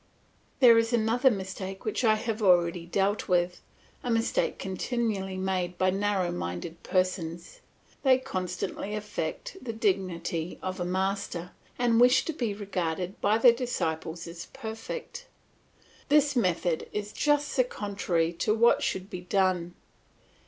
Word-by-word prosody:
There 235 Hz, -3 st, +8 dB
is 230 Hz, +1 st, 0 dB
another 235 Hz, +3 st, +4 dB
mistake 190 Hz, -2 st, -5 dB
which 215 Hz, +3 st, -1 dB
I 220 Hz, -2 st, +5 dB
have 220 Hz, 0 st, -3 dB
already 175 Hz, -3 st, +3 dB
dealt 195 Hz, +3 st, 0 dB
with, 180 Hz, -1 st, +1 dB, 0.4 s
a 245 Hz, -, -3 dB
mistake 230 Hz, -1 st, +1 dB
continually 195 Hz, -1 st, -2 dB
made 185 Hz, -2 st, -1 dB
by 185 Hz, 0 st, +3 dB
narrow 195 Hz, -2 st, 0 dB
minded 160 Hz, -, -5 dB
persons; 175 Hz, -2 st, -2 dB, 0.4 s
they 265 Hz, -2 st, +5 dB
constantly 195 Hz, -3 st, -4 dB
affect 215 Hz, -, -4 dB
the 230 Hz, -3 st, -4 dB
dignity 185 Hz, -5 st, -1 dB
of 185 Hz, 0 st, -3 dB
a 175 Hz, -, -1 dB
master, 190 Hz, -1 st, -2 dB, 0.3 s
and 235 Hz, -1 st, +3 dB
wish 250 Hz, +2 st, +5 dB
to 325 Hz, -, -2 dB
be 240 Hz, -7 st, -1 dB
regarded 185 Hz, -3 st, -3 dB
by 210 Hz, +2 st, +3 dB
their 235 Hz, +1 st, +7 dB
disciples 170 Hz, -9 st, -3 dB
as 170 Hz, 0 st, -8 dB
perfect. 230 Hz, -, -7 dB, 0.8 s
This 290 Hz, -1 st, +4 dB
method 175 Hz, -7 st, 0 dB
is 210 Hz, 0 st, -4 dB
just 295 Hz, 0 st, +1 dB
the 255 Hz, -, +5 dB
contrary 195 Hz, -7 st, -1 dB
of 215 Hz, -, +3 dB
what 235 Hz, +1 st, +5 dB
should 190 Hz, 0 st, -2 dB
be 180 Hz, -2 st, -6 dB
done. 180 Hz, -2 st, 0 dB
195 Hz, 140 wpm, -28 LUFS, 180-230 Hz, 0.8 s, There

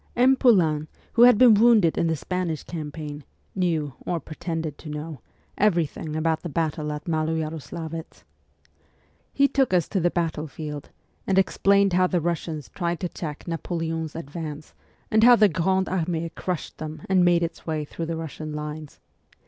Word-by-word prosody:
M. 255 Hz, +2 st, +5 dB
Poulain, 165 Hz, -, +3 dB, 0.3 s
who 235 Hz, -, +3 dB
had 245 Hz, -3 st, +7 dB
been 245 Hz, -1 st, +8 dB
wounded 215 Hz, -6 st, +5 dB
in 170 Hz, -, +1 dB
the 165 Hz, -, +1 dB
Spanish 170 Hz, 0 st, -3 dB
campaign, 150 Hz, -2 st, -6 dB, 0.3 s
knew, 165 Hz, -7 st, -1 dB
or 175 Hz, -, -2 dB
pretended 160 Hz, 0 st, -5 dB
to 155 Hz, -, -9 dB
know, 150 Hz, 0 st, -6 dB, 0.4 s
every 175 Hz, -5 st, +3 dB
thing 155 Hz, +1 st, -7 dB
about 160 Hz, 0 st, 0 dB
the 175 Hz, -, -5 dB
battle 155 Hz, -1 st, -2 dB
at 150 Hz, 0 st, -6 dB
Maloyaroslavetz. 160 Hz, 0 st, -3 dB, 1.1 s
He 280 Hz, 0 st, +4 dB
took 265 Hz, -9 st, +2 dB
us 175 Hz, -, +2 dB
to 195 Hz, -, 0 dB
the 175 Hz, 0 st, +2 dB
battlefield, 155 Hz, -3 st, -4 dB, 0.4 s
and 190 Hz, -, +2 dB
explained 200 Hz, 0 st, +3 dB
how 185 Hz, +1 st, +4 dB
the 180 Hz, -, +1 dB
Russians 165 Hz, -3 st, -3 dB
tried 170 Hz, -2 st, -2 dB
to 180 Hz, -, -2 dB
check 150 Hz, -2 st, -7 dB
Napoleon's 165 Hz, -1 st, -3 dB
advance, 155 Hz, -1 st, -7 dB, 0.4 s
and 220 Hz, 0 st, +4 dB
how 245 Hz, +1 st, +9 dB
the 215 Hz, -2 st, +6 dB
Grande 190 Hz, +3 st, +1 dB
Armee 170 Hz, -2 st, -1 dB
crushed 180 Hz, 0 st, -5 dB
them 155 Hz, 0 st, -6 dB
and 185 Hz, -1 st, +4 dB
made 175 Hz, -1 st, +4 dB
its 165 Hz, 0 st, -5 dB
way 155 Hz, -2 st, -2 dB
through 165 Hz, +2 st, -6 dB
the 165 Hz, 0 st, -3 dB
Russian 155 Hz, -1 st, -6 dB
lines. 150 Hz, 0 st, -6 dB
165 Hz, 165 wpm, -25 LUFS, 155-180 Hz, 1.1 s, how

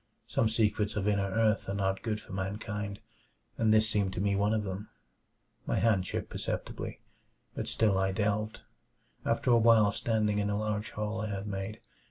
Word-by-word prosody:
Some 110 Hz, -, +1 dB
secrets 105 Hz, -2 st, +1 dB
of 105 Hz, -1 st, 0 dB
inner 100 Hz, -1 st, +2 dB
earth 110 Hz, 0 st, +2 dB
are 100 Hz, -, -1 dB
not 95 Hz, -1 st, 0 dB
good 110 Hz, -2 st, -2 dB
for 100 Hz, -, -11 dB
mankind, 100 Hz, +1 st, -4 dB, 0.5 s
and 110 Hz, -1 st, +2 dB
this 110 Hz, 0 st, +5 dB
seemed 100 Hz, -3 st, 0 dB
to -, -, -3 dB
me 100 Hz, 0 st, +1 dB
one 100 Hz, +1 st, +2 dB
of 110 Hz, -1 st, +1 dB
them. 100 Hz, +1 st, -5 dB, 0.8 s
My -, -, +1 dB
hand 100 Hz, -5 st, +2 dB
shook -, -, -3 dB
perceptibly, -, -, -4 dB, 0.5 s
but -, -, -4 dB
still 105 Hz, -4 st, +2 dB
I 95 Hz, 0 st, +2 dB
delved; 105 Hz, +1 st, -1 dB, 0.6 s
after 115 Hz, +2 st, +1 dB
a 120 Hz, -, +6 dB
while 110 Hz, -2 st, +6 dB
standing 105 Hz, -1 st, +1 dB
in 100 Hz, -, +1 dB
the 105 Hz, -, 0 dB
large 105 Hz, 0 st, -1 dB
hole 105 Hz, +1 st, -3 dB
I 110 Hz, -, -2 dB
had 100 Hz, 0 st, -3 dB
made. 100 Hz, +2 st, -4 dB
105 Hz, 185 wpm, -31 LUFS, 100-110 Hz, 0.8 s, a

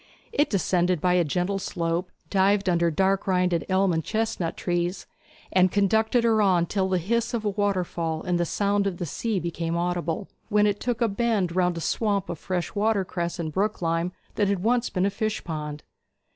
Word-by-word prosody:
It 290 Hz, -, +2 dB
descended 180 Hz, -3 st, +1 dB
by 180 Hz, +3 st, +2 dB
a 180 Hz, -1 st, +4 dB
gentle 180 Hz, +6 st, -1 dB
slope, 170 Hz, 0 st, -2 dB, 0.2 s
dived 195 Hz, 0 st, +3 dB
under 170 Hz, -1 st, +3 dB
dark 190 Hz, +5 st, +1 dB
rinded 180 Hz, -3 st, +1 dB
elm 190 Hz, -1 st, +3 dB
and 160 Hz, 0 st, 0 dB
chestnut 220 Hz, -6 st, -2 dB
trees, 175 Hz, +1 st, -1 dB, 0.5 s
and 185 Hz, -1 st, +4 dB
conducted 220 Hz, +4 st, +2 dB
her 225 Hz, -2 st, +3 dB
on 180 Hz, -4 st, +3 dB
till 190 Hz, +1 st, -1 dB
the 185 Hz, -, +2 dB
hiss 230 Hz, +7 st, 0 dB
of 220 Hz, -2 st, -3 dB
a 205 Hz, -, +1 dB
waterfall 180 Hz, -5 st, -1 dB
and 180 Hz, -2 st, 0 dB
the -, -, +3 dB
sound 200 Hz, +3 st, +1 dB
of 185 Hz, -3 st, -3 dB
the 175 Hz, -, -3 dB
sea 210 Hz, +6 st, -2 dB
became 170 Hz, -1 st, -2 dB
audible, 175 Hz, 0 st, -2 dB, 0.2 s
when 210 Hz, -1 st, +4 dB
it 205 Hz, -1 st, +1 dB
took 245 Hz, -1 st, -2 dB
a 235 Hz, -, +4 dB
bend 200 Hz, -5 st, 0 dB
round 180 Hz, -2 st, +2 dB
a -, -, -4 dB
swamp 200 Hz, +1 st, 0 dB
of 170 Hz, -, -4 dB
fresh 180 Hz, -2 st, -3 dB
watercress 195 Hz, -5 st, 0 dB
and 160 Hz, -2 st, -3 dB
brooklime 175 Hz, -3 st, 0 dB, 0.2 s
that 205 Hz, -, +1 dB
had 195 Hz, -2 st, 0 dB
once 245 Hz, +2 st, +2 dB
been 185 Hz, 0 st, 0 dB
a 200 Hz, -, +1 dB
fish 215 Hz, +1 st, -2 dB
pond. 150 Hz, -2 st, -5 dB
185 Hz, 190 wpm, -25 LUFS, 175-205 Hz, 0.5 s, a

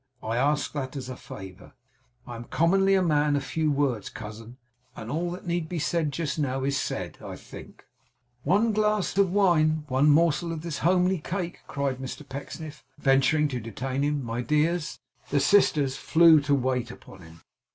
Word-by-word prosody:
I 110 Hz, +1 st, -2 dB
ask 145 Hz, +4 st, +1 dB
that 135 Hz, -2 st, -4 dB
as 130 Hz, -2 st, -6 dB
a 130 Hz, -, -5 dB
favour. 95 Hz, -5 st, -11 dB, 0.5 s
I 120 Hz, -, -8 dB
am 115 Hz, +1 st, -8 dB
commonly 195 Hz, +6 st, +3 dB
a 190 Hz, -, +3 dB
man 150 Hz, -3 st, +2 dB
of 140 Hz, -, -1 dB
few 155 Hz, +2 st, -1 dB
words, 135 Hz, -7 st, 0 dB
cousin; 110 Hz, +3 st, -9 dB, 0.4 s
and 110 Hz, -, -7 dB
all 170 Hz, +4 st, -1 dB
that 180 Hz, +2 st, -7 dB
need 170 Hz, -2 st, -2 dB
be 175 Hz, -, -3 dB
said 155 Hz, 0 st, 0 dB
just 155 Hz, +1 st, -3 dB
now 135 Hz, -2 st, -1 dB
is 140 Hz, +1 st, 0 dB
said, 135 Hz, -, -3 dB
I -, -, -7 dB
think.' -, -, -13 dB, 0.6 s
'One 200 Hz, -, +2 dB
glass 210 Hz, -2 st, +1 dB
of 195 Hz, -3 st, +3 dB
wine 160 Hz, -6 st, +3 dB
one 135 Hz, +3 st, +3 dB
morsel 165 Hz, +2 st, +3 dB
of 160 Hz, -2 st, -5 dB
this 170 Hz, -4 st, -4 dB
homely 180 Hz, +1 st, +2 dB
cake?' 175 Hz, +2 st, -4 dB
cried 140 Hz, -2 st, -2 dB
Mr 135 Hz, +2 st, -7 dB
Pecksniff, 145 Hz, +3 st, -8 dB
venturing 140 Hz, +2 st, +3 dB
to 125 Hz, -3 st, -3 dB
detain 130 Hz, +4 st, -4 dB
him. 145 Hz, -1 st, 0 dB
'My 115 Hz, +1 st, -3 dB
dears 150 Hz, +4 st, 0 dB, 0.2 s
!' -, -, -30 dB
The 145 Hz, -, +2 dB
sisters 145 Hz, -5 st, +3 dB
flew 165 Hz, 0 st, +6 dB
to 145 Hz, 0 st, +2 dB
wait 125 Hz, -2 st, -1 dB
upon 100 Hz, -5 st, -13 dB
him. 80 Hz, 0 st, -15 dB
150 Hz, 185 wpm, -26 LUFS, 130-170 Hz, 0.6 s, flew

